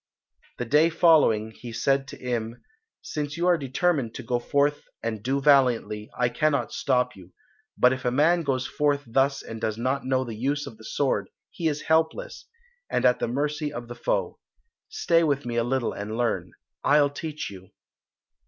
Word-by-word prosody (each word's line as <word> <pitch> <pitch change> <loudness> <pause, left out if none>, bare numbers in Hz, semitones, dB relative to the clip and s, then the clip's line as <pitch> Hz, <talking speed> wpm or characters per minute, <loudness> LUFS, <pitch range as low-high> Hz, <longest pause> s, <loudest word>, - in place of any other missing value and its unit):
The 125 - -3
day 150 +7 +4
following 150 -10 +4
he 120 +2 -10
said 135 +4 +1
to - - -10
Im, 120 -2 -4 0.4
"Since 150 0 -4
you 170 - 0
are 180 -1 +5
determined 140 -3 0
to - - -6
go 120 +1 0
forth 145 +4 0 0.2
and 110 -2 -3
do 135 +5 0
valiantly, 125 -7 +3
I 125 - +3
cannot 145 +4 0
stop 125 -2 +1
you, 90 -1 -15 0.4
but 125 +1 +5
if 130 - -6
a 125 - +2
man 155 +7 +3
goes 135 -4 -1
forth 145 -1 0
thus 135 +4 +1
and 115 -1 -8
does 110 -1 -1
not 130 +4 -1
know 130 0 +1
the 120 -3 -6
use 140 +6 -1
of 110 - -10
the - - -13
sword 110 -4 -1 0.2
he 165 - -2
is 150 -1 -2
helpless, 160 - 0 0.4
and - - 0
at 125 0 +4
the - - -1
mercy 145 +4 -2
of 120 0 -7
the 120 - -7
foe. - - -2 0.5
Stay 170 - +2
with 145 -3 0
me 120 -1 -3
a 120 - +2
little 125 0 -1
and 105 +2 -5
learn. 120 -2 -1 0.3
I'll 145 -1 +4
teach 155 -4 -5
you." 95 -1 -12
135 Hz, 185 wpm, -26 LUFS, 120-150 Hz, 0.5 s, are